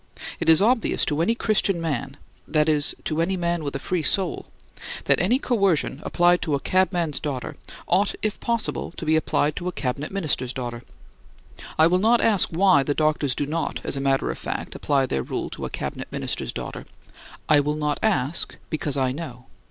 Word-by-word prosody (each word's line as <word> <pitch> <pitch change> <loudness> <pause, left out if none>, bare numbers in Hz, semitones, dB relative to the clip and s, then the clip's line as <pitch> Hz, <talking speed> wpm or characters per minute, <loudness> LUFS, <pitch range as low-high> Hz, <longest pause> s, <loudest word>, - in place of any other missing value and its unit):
It - - 0
is 160 +4 +7
obvious 230 +1 +2
to 150 +1 0
any 225 +7 +2
Christian 205 -5 +2
man 145 -4 -3 0.3
(that 155 -1 +2
is, 150 -2 +2
to 155 +1 -1
any 190 +3 0
man 170 -2 -1
with 140 -1 -4
a - - +1
free 180 +4 -2
soul) 185 +2 +1 0.6
that - - +4
any 205 +9 +3
coercion 195 - 0
applied 175 0 +3
to 155 -5 0
a - - -1
cabman's 175 -2 +1
daughter 135 -5 -4 0.3
ought, 195 +3 +2
if 215 -2 -1
possible, 235 -1 -1
to - - -5
be 155 0 +3
applied 155 -1 +1
to 180 - -4
a - - -1
Cabinet 140 0 -3
Minister's 145 -9 -1
daughter. 120 -2 -5 1.0
I 155 - +6
will 180 +2 +3
not 230 +4 +4
ask 215 -5 +4
why 180 -2 +4
the 145 +1 -1
doctors 150 -4 +1
do 145 - -1
not, 160 +3 -2
as - - -2
a 135 - -3
matter 135 0 +1
of - - -8
fact - - -4
apply 140 -2 +1
their 65 - -1
rule - - -4
to - - -5
a - - -4
Cabinet - - -5
Minister's - - -2
daughter. - - -6 0.6
I 150 - +6
will 150 +1 0
not 150 -1 -1
ask, 170 -8 0 0.2
because 150 -3 -1
I 130 -1 +1
know. 130 -4 -7
160 Hz, 195 wpm, -24 LUFS, 140-185 Hz, 1.0 s, is